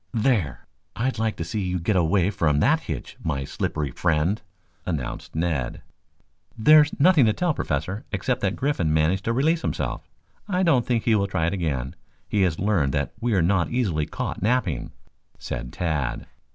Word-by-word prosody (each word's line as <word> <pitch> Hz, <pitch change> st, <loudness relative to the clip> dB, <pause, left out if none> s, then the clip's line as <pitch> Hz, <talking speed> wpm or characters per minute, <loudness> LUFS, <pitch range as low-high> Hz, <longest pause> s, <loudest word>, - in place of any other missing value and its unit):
"There, 110 Hz, -, 0 dB, 0.3 s
I'd 125 Hz, 0 st, -1 dB
like 110 Hz, -1 st, 0 dB
to -, -, -4 dB
see 105 Hz, +6 st, -3 dB
you 90 Hz, -1 st, -1 dB
get 95 Hz, +5 st, 0 dB
away 90 Hz, +2 st, +2 dB
from 75 Hz, -7 st, +1 dB
that -, -, +4 dB
hitch, -, -, -6 dB
my 70 Hz, -4 st, -1 dB
slippery 75 Hz, +1 st, -3 dB
friend," 85 Hz, -, 0 dB, 0.4 s
announced 75 Hz, -8 st, -4 dB
Ned. 80 Hz, -6 st, -2 dB, 0.7 s
"There's 150 Hz, +7 st, +5 dB
nothing 150 Hz, -5 st, +6 dB
to 110 Hz, -, +3 dB
tell, 175 Hz, +6 st, 0 dB
Professor, 90 Hz, -, -2 dB
except 95 Hz, -3 st, -1 dB
that 100 Hz, 0 st, 0 dB
Griffin 130 Hz, -, 0 dB
managed 80 Hz, +5 st, +1 dB
to 115 Hz, -, +1 dB
release 155 Hz, +7 st, +2 dB
himself. -, -, -3 dB, 0.4 s
I 185 Hz, -2 st, +1 dB
don't 135 Hz, -9 st, +3 dB
think 120 Hz, -3 st, +1 dB
he 115 Hz, -, +3 dB
will 100 Hz, -2 st, +2 dB
try 80 Hz, -4 st, 0 dB
it 85 Hz, -, 0 dB
again. 70 Hz, -9 st, -2 dB, 0.3 s
He 105 Hz, -, +1 dB
has 90 Hz, -4 st, +2 dB
learned 90 Hz, -9 st, +1 dB
that 70 Hz, -1 st, -1 dB
we 120 Hz, -2 st, 0 dB
are 90 Hz, -, +3 dB
not 90 Hz, 0 st, +2 dB
easily 90 Hz, -12 st, 0 dB
caught -, -, -4 dB
napping," 105 Hz, -, 0 dB, 0.5 s
said -, -, -5 dB
Tad. 75 Hz, -8 st, -2 dB
95 Hz, 175 wpm, -24 LUFS, 80-115 Hz, 0.7 s, nothing